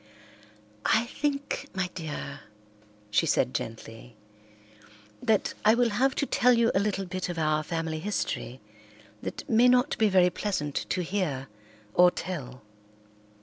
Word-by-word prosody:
"I 225 Hz, +2 st, +3 dB
think, 285 Hz, +2 st, -3 dB
my 190 Hz, -1 st, -1 dB
dear," 145 Hz, -4 st, -6 dB, 0.7 s
she -, -, +2 dB
said 65 Hz, -, +2 dB
gently, 115 Hz, -, -6 dB, 1.1 s
"that 215 Hz, -2 st, +1 dB
I 215 Hz, +2 st, +6 dB
will 240 Hz, -1 st, +2 dB
have 265 Hz, +6 st, +2 dB
to -, -, 0 dB
tell 250 Hz, -2 st, +4 dB
you 230 Hz, -1 st, +3 dB
a -, -, +3 dB
little 200 Hz, -1 st, -1 dB
bit 185 Hz, 0 st, -4 dB
of 175 Hz, -, -4 dB
our 155 Hz, -1 st, +1 dB
family 160 Hz, 0 st, -3 dB
history 160 Hz, -, -3 dB, 0.6 s
that -, -, -6 dB
may 235 Hz, +2 st, +5 dB
not 250 Hz, +3 st, +4 dB
be 220 Hz, -1 st, +4 dB
very 180 Hz, -2 st, +4 dB
pleasant 150 Hz, -10 st, -2 dB, 0.2 s
to 180 Hz, -, 0 dB
hear 165 Hz, -8 st, -2 dB, 0.4 s
or 180 Hz, 0 st, +7 dB
tell. 140 Hz, -10 st, -6 dB
185 Hz, 140 wpm, -28 LUFS, 155-225 Hz, 1.1 s, or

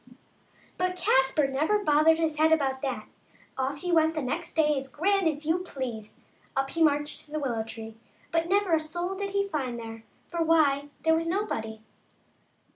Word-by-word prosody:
But 365 Hz, 0 st, 0 dB
Caspar 270 Hz, -3 st, +3 dB
never 300 Hz, +10 st, +1 dB
bothered 310 Hz, +1 st, +5 dB
his 320 Hz, -2 st, 0 dB
head 315 Hz, +1 st, +5 dB
about 270 Hz, -4 st, +2 dB
that; 250 Hz, -6 st, -3 dB, 0.5 s
off 270 Hz, +2 st, -2 dB
he 360 Hz, -, -2 dB
went 320 Hz, -1 st, +3 dB
the 305 Hz, -, -2 dB
next 320 Hz, +7 st, -3 dB
day 300 Hz, -2 st, +3 dB
as 270 Hz, 0 st, -8 dB
grand 390 Hz, +4 st, +1 dB
as 305 Hz, -1 st, -2 dB
you 325 Hz, +3 st, +2 dB
please. 250 Hz, -11 st, -6 dB, 0.4 s
Up 270 Hz, 0 st, 0 dB
he 330 Hz, -, -3 dB
marched 295 Hz, -1 st, +1 dB
to -, -, -19 dB
the 310 Hz, -, -2 dB
willow 245 Hz, -6 st, -1 dB
tree, 225 Hz, 0 st, -9 dB, 0.3 s
but 330 Hz, +1 st, 0 dB
never 395 Hz, -2 st, +2 dB
a 320 Hz, -, +5 dB
soul 345 Hz, +4 st, -3 dB
did 400 Hz, +1 st, -3 dB
he 400 Hz, 0 st, 0 dB
find 265 Hz, -9 st, -3 dB
there; 225 Hz, -1 st, -8 dB, 0.3 s
for 340 Hz, -1 st, -1 dB
why, 295 Hz, -3 st, +3 dB
there 320 Hz, -, +4 dB
was 330 Hz, +1 st, 0 dB
nobody. 225 Hz, -, -3 dB
310 Hz, 185 wpm, -28 LUFS, 265-330 Hz, 0.5 s, bothered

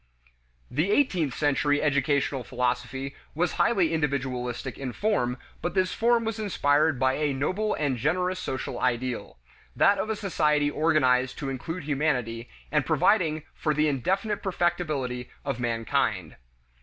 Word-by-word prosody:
The 155 Hz, +9 st, +1 dB
eighteenth 185 Hz, -, +2 dB
century 145 Hz, 0 st, +2 dB
educational 140 Hz, -2 st, +1 dB
philosophy 125 Hz, +2 st, -2 dB, 0.2 s
was 175 Hz, +2 st, +1 dB
highly 190 Hz, -8 st, +3 dB
individualistic 130 Hz, -5 st, -2 dB
in 130 Hz, -3 st, -4 dB
form, 135 Hz, -, 0 dB, 0.2 s
but 175 Hz, +1 st, -3 dB
this 185 Hz, -1 st, +2 dB
form 235 Hz, 0 st, +2 dB
was 220 Hz, -1 st, -3 dB
inspired 150 Hz, -, +2 dB
by 130 Hz, 0 st, +3 dB
a 150 Hz, -2 st, 0 dB
noble 185 Hz, +11 st, 0 dB
and 140 Hz, -4 st, 0 dB
generous 180 Hz, +8 st, 0 dB
social 130 Hz, -7 st, -4 dB
ideal: 125 Hz, -3 st, -2 dB, 0.4 s
that 200 Hz, 0 st, +4 dB
of 215 Hz, -, -2 dB
a 220 Hz, -, 0 dB
society 150 Hz, -7 st, +1 dB
organized 130 Hz, -5 st, +2 dB
to 140 Hz, -2 st, -3 dB
include 165 Hz, +7 st, -5 dB
humanity, 130 Hz, -6 st, -1 dB, 0.2 s
and 150 Hz, -2 st, +2 dB
providing 160 Hz, 0 st, +2 dB
for 150 Hz, -2 st, -1 dB
the 155 Hz, +1 st, +3 dB
indefinite 190 Hz, -, 0 dB
perfectibility 155 Hz, -9 st, -1 dB, 0.2 s
of 135 Hz, -3 st, -2 dB
mankind. 115 Hz, -2 st, -1 dB
145 Hz, 135 wpm, -27 LUFS, 130-175 Hz, 0.4 s, that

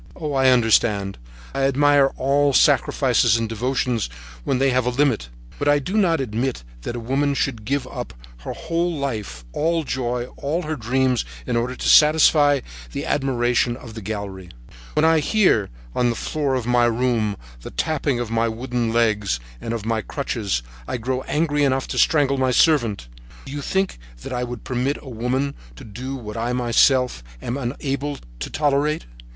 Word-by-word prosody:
Oh, 150 Hz, -4 st, -4 dB
I 135 Hz, -1 st, +4 dB
understand, 110 Hz, -, +2 dB, 0.3 s
I 135 Hz, -, -2 dB
admire 140 Hz, 0 st, +4 dB
all 140 Hz, +1 st, +2 dB
sacrifices 115 Hz, -, +4 dB
and 115 Hz, -1 st, -1 dB
devotions 120 Hz, -, -1 dB, 0.3 s
when 130 Hz, -, 0 dB
they 135 Hz, +1 st, +2 dB
have 125 Hz, -1 st, +1 dB
a -, -, +4 dB
limit, 125 Hz, -, +1 dB, 0.3 s
but -, -, -1 dB
I 145 Hz, 0 st, +5 dB
do 160 Hz, +8 st, -4 dB
not 180 Hz, -7 st, +3 dB
admit 125 Hz, -, -2 dB, 0.2 s
that 120 Hz, -, -5 dB
a -, -, -3 dB
woman 140 Hz, +4 st, 0 dB
should 115 Hz, -6 st, -2 dB
give 140 Hz, +1 st, -1 dB
up 125 Hz, -1 st, -6 dB, 0.3 s
her -, -, -6 dB
whole 170 Hz, 0 st, -2 dB
life, 105 Hz, -, -4 dB
all 165 Hz, +1 st, +1 dB
joy, 125 Hz, -3 st, -2 dB
all 160 Hz, +6 st, -2 dB
her 155 Hz, 0 st, -3 dB
dreams, 130 Hz, 0 st, +1 dB, 0.2 s
in -, -, -1 dB
order 120 Hz, +2 st, -1 dB
to -, -, -3 dB
satisfy 150 Hz, -2 st, +6 dB, 0.3 s
the -, -, -4 dB
admiration 125 Hz, -3 st, +1 dB
of 120 Hz, -3 st, -11 dB
the 110 Hz, -, -7 dB
gallery. 100 Hz, -3 st, -6 dB, 0.4 s
When 150 Hz, -, +3 dB
I 160 Hz, 0 st, +5 dB
hear, 155 Hz, -, +2 dB, 0.2 s
on 120 Hz, -1 st, +2 dB
the 120 Hz, -, -1 dB
floor 145 Hz, -1 st, -1 dB
of 125 Hz, -3 st, -2 dB
my 120 Hz, 0 st, +3 dB
room, 115 Hz, -3 st, +1 dB, 0.2 s
the -, -, -8 dB
tapping 140 Hz, -, -1 dB
of 120 Hz, -2 st, -3 dB
my 115 Hz, 0 st, +2 dB
wooden 120 Hz, 0 st, -2 dB
legs 105 Hz, -, +1 dB, 0.2 s
and 115 Hz, -, -4 dB
of 115 Hz, -2 st, -3 dB
my 115 Hz, -1 st, 0 dB
crutches, 105 Hz, -, -2 dB, 0.2 s
I -, -, -2 dB
grow 130 Hz, +2 st, -2 dB
angry 150 Hz, -1 st, +1 dB
enough 135 Hz, -1 st, +1 dB
to -, -, -1 dB
strangle 140 Hz, -3 st, +3 dB
my 130 Hz, -1 st, +2 dB
servant. 120 Hz, -, +2 dB, 0.4 s
Do 135 Hz, -, -8 dB
you 145 Hz, 0 st, -4 dB
think 190 Hz, -, -1 dB, 0.2 s
that -, -, -6 dB
I 125 Hz, 0 st, -1 dB
would 120 Hz, -2 st, -7 dB
permit 130 Hz, +3 st, -1 dB
a 135 Hz, -, -11 dB
woman 130 Hz, +4 st, -1 dB, 0.2 s
to -, -, -11 dB
do 125 Hz, +6 st, -6 dB
what 110 Hz, -4 st, -7 dB
I 120 Hz, +2 st, -1 dB
myself 125 Hz, -, +3 dB, 0.2 s
am 120 Hz, -, -4 dB
unable 140 Hz, +2 st, -3 dB, 0.2 s
to -, -, -4 dB
tolerate? 150 Hz, +1 st, +1 dB
130 Hz, 180 wpm, -22 LUFS, 115-140 Hz, 0.4 s, satisfy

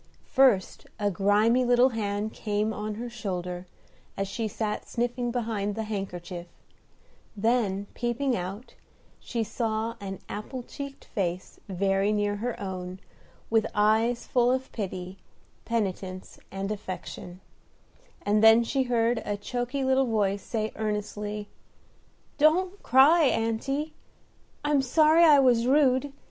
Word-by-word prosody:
First 255 Hz, -9 st, +3 dB
a 205 Hz, -1 st, +1 dB
grimy 210 Hz, +6 st, +3 dB
little 245 Hz, +1 st, +5 dB
hand 215 Hz, -2 st, -2 dB
came 210 Hz, 0 st, -1 dB
on 210 Hz, 0 st, -4 dB
her 240 Hz, +3 st, -5 dB
shoulder, 180 Hz, -6 st, -5 dB, 0.5 s
as 195 Hz, -, -1 dB
she 220 Hz, +3 st, -3 dB
sat 215 Hz, 0 st, -3 dB
sniffing 240 Hz, +1 st, -1 dB
behind 220 Hz, -4 st, -2 dB
the 225 Hz, -, -2 dB
handkerchief; 180 Hz, -4 st, -5 dB, 0.9 s
then, 205 Hz, -3 st, +1 dB
peeping 245 Hz, +2 st, -1 dB
out, 195 Hz, +5 st, -6 dB, 0.5 s
she 235 Hz, -2 st, -3 dB
saw 220 Hz, +1 st, -2 dB
an 195 Hz, -1 st, -5 dB
apple 245 Hz, +4 st, -6 dB
cheeked 280 Hz, +2 st, -8 dB
face 180 Hz, -2 st, -3 dB
very 195 Hz, +2 st, +1 dB
near 205 Hz, -1 st, 0 dB
her 240 Hz, +3 st, -3 dB
own, 185 Hz, -1 st, -5 dB, 0.5 s
with 225 Hz, -1 st, +3 dB
eyes 220 Hz, +3 st, +2 dB
full 245 Hz, -1 st, +2 dB
of 260 Hz, 0 st, -2 dB
pity, 185 Hz, -3 st, -5 dB, 0.5 s
penitence, 190 Hz, -4 st, -3 dB
and 195 Hz, +1 st, -4 dB
affection; 185 Hz, -3 st, -7 dB, 0.8 s
and 210 Hz, +1 st, +2 dB
then 225 Hz, +1 st, +8 dB
she 265 Hz, +4 st, 0 dB
heard 235 Hz, -1 st, +2 dB
a 205 Hz, -, -2 dB
choky 245 Hz, +5 st, -3 dB
little 265 Hz, 0 st, +3 dB
voice 205 Hz, -3 st, +1 dB
say 220 Hz, 0 st, -3 dB
earnestly, 210 Hz, -1 st, -3 dB, 0.9 s
"Don't 360 Hz, +6 st, +3 dB
cry, 290 Hz, +6 st, +6 dB
aunty; 270 Hz, +6 st, 0 dB, 0.7 s
I'm 295 Hz, -2 st, +3 dB
sorry 310 Hz, +5 st, +5 dB
I 305 Hz, -3 st, +8 dB
was 245 Hz, -3 st, +4 dB
rude. 270 Hz, 0 st, +3 dB
220 Hz, 125 wpm, -27 LUFS, 200-245 Hz, 0.9 s, then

